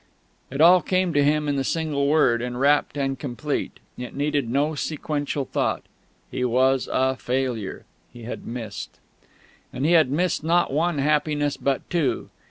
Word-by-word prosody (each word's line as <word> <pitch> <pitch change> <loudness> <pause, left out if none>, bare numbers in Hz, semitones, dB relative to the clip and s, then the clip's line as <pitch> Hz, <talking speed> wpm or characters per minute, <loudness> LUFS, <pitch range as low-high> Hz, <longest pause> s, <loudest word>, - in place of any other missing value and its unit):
It 135 +3 -2
all 180 +2 +7
came 185 +1 0
to 145 - +3
him 150 +1 +2
in 145 -1 0
the 135 - 0
single 150 -2 -1
word, 135 -6 +3
enwrapped 135 +4 +1
and 135 -2 -1
complete; 140 +3 -4 0.2
it 125 - -7
needed 145 -3 0
no 145 +5 +1
sequential 145 -2 -3
thought; - - -1 0.5
he 125 - -2
was 130 +2 +2
a 130 0 +1
failure. 125 -6 -3 0.3
He 120 - -12
had 120 - -7
missed.... 115 -4 -6 0.7
And 135 - -3
he 165 - +3
had 160 -6 +5
missed 165 +3 0
not 170 -2 +2
one 165 +2 +1
happiness, 145 0 +1
but 135 -1 -2
two. 170 -5 -1
140 Hz, 160 wpm, -24 LUFS, 130-155 Hz, 0.7 s, all